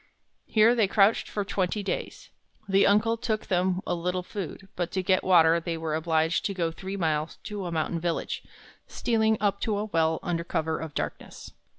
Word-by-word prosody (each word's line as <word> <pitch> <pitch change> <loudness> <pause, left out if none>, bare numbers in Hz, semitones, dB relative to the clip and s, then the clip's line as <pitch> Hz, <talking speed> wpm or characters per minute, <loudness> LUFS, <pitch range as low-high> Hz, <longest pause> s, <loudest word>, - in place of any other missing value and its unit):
Here 220 +2 +5
they 225 -4 +3
crouched 200 +2 +3
for 205 -1 -2
twenty 195 +1 -1
days. 200 - -4 0.4
The 195 0 +4
uncle 215 +3 +3
took 220 -2 -2
them 185 0 +1
a - - -1
little 180 +1 -2
food, 195 0 -7
but 175 -1 -2
to 190 - -1
get 185 0 +2
water 170 -2 +5
they 165 0 -3
were 160 -1 -3
obliged 160 +1 +1
to 200 - -1
go 170 -3 0
three 190 +4 -6
miles 155 -3 -1
to 205 -3 -5
a - - -4
mountain 165 +1 -1
village, 170 0 -2 0.5
stealing 220 -2 +1
up 200 -1 0
to 215 -2 0
a 210 - -1
well 160 -5 +1
under 170 -1 -1
cover 160 -2 -2
of 160 -2 -7
darkness. - - -5
185 Hz, 190 wpm, -27 LUFS, 165-205 Hz, 0.5 s, Here